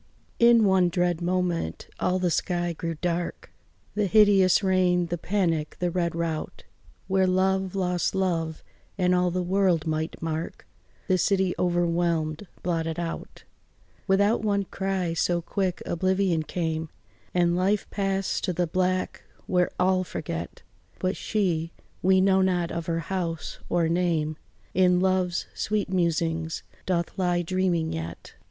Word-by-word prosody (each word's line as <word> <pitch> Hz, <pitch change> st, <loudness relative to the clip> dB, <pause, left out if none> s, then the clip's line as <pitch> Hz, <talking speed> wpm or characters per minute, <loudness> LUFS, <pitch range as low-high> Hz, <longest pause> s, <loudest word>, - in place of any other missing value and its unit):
In 235 Hz, -2 st, +6 dB
one 190 Hz, -2 st, +4 dB
dread 175 Hz, -1 st, 0 dB
moment 175 Hz, -, -1 dB
all 185 Hz, -, +1 dB
the 180 Hz, -2 st, 0 dB
sky 175 Hz, 0 st, 0 dB
grew 165 Hz, 0 st, -4 dB
dark, 175 Hz, -1 st, -2 dB, 0.4 s
The 210 Hz, -1 st, +1 dB
hideous 200 Hz, -1 st, +5 dB
rain, 180 Hz, -2 st, +3 dB
the 175 Hz, +1 st, -3 dB
panic, 165 Hz, -6 st, 0 dB
the 180 Hz, -1 st, 0 dB
red 170 Hz, -1 st, -1 dB
rout, 165 Hz, -2 st, -3 dB, 0.4 s
Where 190 Hz, 0 st, +2 dB
love 190 Hz, +1 st, +1 dB
lost 180 Hz, -1 st, 0 dB
love, 165 Hz, -4 st, -1 dB, 0.3 s
and 180 Hz, -1 st, +2 dB
all 180 Hz, 0 st, +3 dB
the 180 Hz, +1 st, -1 dB
world 185 Hz, -3 st, +2 dB
might 160 Hz, 0 st, -2 dB
mark 160 Hz, 0 st, -4 dB, 0.4 s
The 185 Hz, -1 st, +2 dB
city 190 Hz, -1 st, +2 dB
overwhelmèd, 170 Hz, -1 st, 0 dB, 0.2 s
blotted 165 Hz, -2 st, -1 dB
out 170 Hz, -1 st, -5 dB, 0.6 s
Without 200 Hz, +4 st, +3 dB
one 200 Hz, -2 st, +1 dB
cry, 190 Hz, -3 st, -2 dB
so 175 Hz, +1 st, +1 dB
quick 185 Hz, +1 st, -2 dB
oblivion 185 Hz, -1 st, +1 dB
came, 160 Hz, -1 st, -3 dB, 0.5 s
And 175 Hz, -1 st, +3 dB
life 195 Hz, +3 st, +1 dB
passed 195 Hz, -1 st, -1 dB
to 180 Hz, -, -1 dB
the 175 Hz, +1 st, +1 dB
black 185 Hz, +2 st, -1 dB, 0.2 s
where 180 Hz, -1 st, +2 dB
all 185 Hz, 0 st, +3 dB
forget; -, -, -6 dB, 0.3 s
But 185 Hz, +1 st, -1 dB
she 170 Hz, -6 st, -1 dB, 0.3 s
we 190 Hz, +1 st, +4 dB
know 190 Hz, 0 st, +4 dB
not 180 Hz, -2 st, +1 dB
of 170 Hz, -1 st, -4 dB
her 165 Hz, -1 st, 0 dB
house 170 Hz, -2 st, -4 dB
or 170 Hz, -2 st, +2 dB
name 165 Hz, -3 st, 0 dB, 0.4 s
In 180 Hz, -1 st, +4 dB
love's 185 Hz, -2 st, +1 dB
sweet 210 Hz, -2 st, -1 dB
musings 165 Hz, -2 st, 0 dB, 0.2 s
doth 175 Hz, -2 st, -1 dB
lie 175 Hz, -1 st, +1 dB
dreaming 175 Hz, -2 st, 0 dB
yet. 80 Hz, +1 st, -6 dB
180 Hz, 140 wpm, -26 LUFS, 170-190 Hz, 0.6 s, In